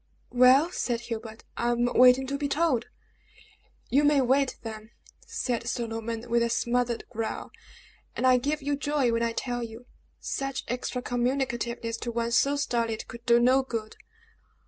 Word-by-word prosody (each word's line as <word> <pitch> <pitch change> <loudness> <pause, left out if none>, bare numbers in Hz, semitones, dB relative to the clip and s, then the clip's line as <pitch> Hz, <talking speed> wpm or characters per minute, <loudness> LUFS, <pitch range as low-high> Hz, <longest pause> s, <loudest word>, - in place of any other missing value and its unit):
"Well," 255 +6 +5
said 240 -8 -2
Hubert, 225 -1 -7
"I 240 - 0
am 240 0 +1
waiting 250 +2 +5
to 280 +1 -3
be 290 - -1
told." 280 -5 +1 1.1
"You 280 +3 +4
may 290 -1 +4
wait, 265 +1 +2
then!" 220 -1 -7 0.4
said 235 -2 -2
Sir 240 0 -1
Norman, 225 +1 -5
with 235 0 +2
a 235 - +1
smothered 240 0 0
growl; 225 -1 -4 0.6
"and - - -1
I 255 -1 +6
give 290 +3 -2
you 285 +1 0
joy 285 -3 0
when 230 0 0
I 230 0 0
tell 245 0 -3
you. 230 +1 -8 0.3
Such 275 -1 -3
extra 250 0 -3
communicativeness 240 -2 -1
to 235 - -4
one 235 0 -2
so 275 +4 +3
stolid 230 -5 -1
could 235 0 -10
do 235 0 +6
no 255 +3 +4
good!" 225 -4 -5
245 Hz, 165 wpm, -27 LUFS, 235-265 Hz, 1.1 s, I